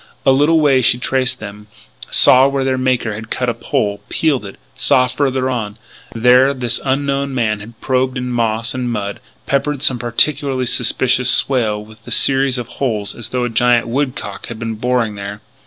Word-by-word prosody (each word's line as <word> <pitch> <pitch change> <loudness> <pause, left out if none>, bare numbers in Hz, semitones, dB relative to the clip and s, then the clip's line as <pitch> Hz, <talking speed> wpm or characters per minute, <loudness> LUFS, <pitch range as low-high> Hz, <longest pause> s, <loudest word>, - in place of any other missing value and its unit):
A 135 - +5
little 145 +5 +3
way 140 -4 +3
she 120 - +2
traced 130 0 0
them, 105 0 -10 0.4
saw 130 +1 +6
where 140 -1 -1
their 130 0 0
maker 125 -4 0
had 110 +2 -8
cut 125 -1 -1
a - - 0
pole, 105 -8 -2
peeled 145 -9 0
it; 100 - -9 0.2
saw, 125 - +3
farther 130 0 -1
on, 110 -5 -3 0.4
where 125 +4 +4
this 120 -2 -2
unknown 140 0 -1
man 110 -4 0
had 110 +2 -12
probed 130 0 0
in 125 0 -4
moss 115 0 -1
and 125 -1 -3
mud 100 -3 -4 0.3
peppered 140 0 -1
some 130 -3 +2
particularly 130 +2 0
suspicious 125 +1 +1
swale 110 -6 +2
with 110 0 -16
a - - -6
series 135 -1 +2
of 120 -2 -5
holes 110 -6 -1
as 120 - -6
though 125 -1 -2
a 120 - -1
giant 120 +1 +2
woodcock 130 +2 -3
had 115 - -7
been 115 0 -4
"boring" 115 0 -1
there. 100 0 -7
125 Hz, 185 wpm, -17 LUFS, 115-135 Hz, 0.4 s, saw